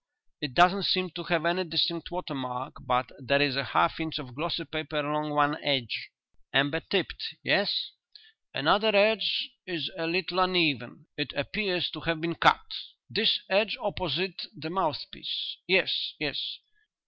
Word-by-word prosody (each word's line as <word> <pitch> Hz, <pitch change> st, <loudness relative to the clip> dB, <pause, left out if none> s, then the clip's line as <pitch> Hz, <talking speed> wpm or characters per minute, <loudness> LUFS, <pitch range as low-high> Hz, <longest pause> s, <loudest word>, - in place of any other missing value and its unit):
It 145 Hz, -4 st, -4 dB
doesn't 180 Hz, +2 st, +5 dB
seem 185 Hz, -1 st, +2 dB
to 170 Hz, +2 st, -6 dB
have 170 Hz, -1 st, +1 dB
any 175 Hz, +2 st, +2 dB
distinct 165 Hz, 0 st, 0 dB
watermark 135 Hz, -8 st, -5 dB
but 125 Hz, 0 st, +1 dB
there 140 Hz, +1 st, +2 dB
is 145 Hz, -2 st, +3 dB
a 140 Hz, -, 0 dB
half 165 Hz, -, +2 dB
inch 160 Hz, -2 st, -3 dB
of 130 Hz, -5 st, -8 dB
glossy 165 Hz, +4 st, -2 dB
paper 155 Hz, +1 st, -4 dB
along 150 Hz, +1 st, -1 dB
one 150 Hz, +1 st, +1 dB
edge." 135 Hz, -6 st, 0 dB, 0.4 s
"Amber 140 Hz, +4 st, +3 dB
tipped. 200 Hz, -, -2 dB
Yes?" -, -, +2 dB, 0.6 s
"Another 215 Hz, 0 st, +3 dB
edge 220 Hz, +6 st, +3 dB, 0.2 s
is 165 Hz, -6 st, -3 dB
a 165 Hz, -, -1 dB
little 180 Hz, +1 st, 0 dB
uneven; 160 Hz, -7 st, +2 dB
it 145 Hz, -, -2 dB
appears 180 Hz, +3 st, -1 dB
to 155 Hz, -, -7 dB
have 165 Hz, +1 st, -1 dB
been 170 Hz, +1 st, -2 dB
cut." 445 Hz, -, +4 dB, 0.5 s
"This 215 Hz, +1 st, +3 dB
edge 200 Hz, +1 st, +2 dB
opposite 185 Hz, -2 st, -2 dB
the 160 Hz, +2 st, -6 dB
mouthpiece. 190 Hz, +1 st, -3 dB
Yes, -, -, +3 dB
yes." -, -, -2 dB
165 Hz, 150 wpm, -28 LUFS, 145-185 Hz, 0.6 s, doesn't